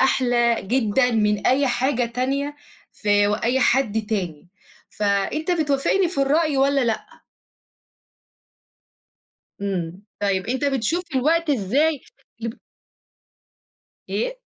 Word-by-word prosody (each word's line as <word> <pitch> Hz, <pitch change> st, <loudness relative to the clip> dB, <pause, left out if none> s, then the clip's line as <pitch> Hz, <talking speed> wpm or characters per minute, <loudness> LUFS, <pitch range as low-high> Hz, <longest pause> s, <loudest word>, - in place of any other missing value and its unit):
أحلى 245 Hz, -3 st, +3 dB
جدًا 245 Hz, +3 st, +1 dB
من 210 Hz, -2 st, +1 dB
أي 275 Hz, +2 st, +3 dB
حاجة 250 Hz, 0 st, +1 dB
تانية 275 Hz, +5 st, -2 dB, 0.4 s
ف 210 Hz, -, -14 dB
وأي 205 Hz, +5 st, +2 dB
حد 220 Hz, -5 st, +1 dB
تاني. 180 Hz, -6 st, -4 dB, 0.4 s
فأنت 205 Hz, -, -1 dB
بتوافقني 320 Hz, +3 st, +1 dB
في 345 Hz, -, -3 dB
الرأي 300 Hz, +1 st, +2 dB
والّا 275 Hz, +1 st, +3 dB
لأ؟ 225 Hz, -2 st, -1 dB, 2.6 s
إمم. 185 Hz, -1 st, -3 dB, 0.2 s
طيب 190 Hz, -2 st, 0 dB
أنت 260 Hz, +4 st, -1 dB
بتشوف 280 Hz, +6 st, 0 dB
الوقت 320 Hz, +5 st, +2 dB
إزاي 280 Hz, +6 st, +1 dB, 0.4 s
اللي 230 Hz, 0 st, -4 dB
ب -, -, -29 dB, 1.5 s
إيه؟ -, -, -2 dB
250 Hz, 105 wpm, -22 LUFS, 210-280 Hz, 2.6 s, أحلى